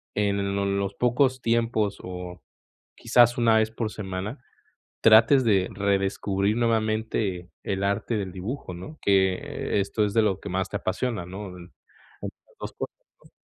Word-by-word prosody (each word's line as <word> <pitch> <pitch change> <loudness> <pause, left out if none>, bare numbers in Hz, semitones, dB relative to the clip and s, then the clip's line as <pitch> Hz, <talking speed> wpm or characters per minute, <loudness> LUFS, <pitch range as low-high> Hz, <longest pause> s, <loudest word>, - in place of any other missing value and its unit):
en 100 -1 0
lo 100 - 0
los 100 0 -1
pocos 130 +2 +2
tiempos 115 -3 +1
o 90 -1 -7 0.6
quizás 120 -1 +4
una 115 -2 +4
vez 110 0 +1
por 110 -1 -3
semana, 100 +3 -5 0.6
trates 115 +5 +7
de 95 -5 +2
redescubrir 100 +1 0
nuevamente 110 -5 0
el 95 0 -2
arte 100 +3 0
del 95 -3 -3
dibujo, 95 +2 -5
¿no?, 95 - -9
que 95 0 +1
esto 100 +2 0
es 100 - -3
de 110 0 +4
lo 100 -3 +1
que - - -7
más 95 +1 -1
te - - -2
apasiona, 115 -8 -2
¿no?, 95 +2 -7
esas 90 0 -13
2 - - -6
cosas, - - -6 0.3
¿no? - - -18
100 Hz, 150 wpm, -26 LUFS, 95-115 Hz, 0.6 s, trates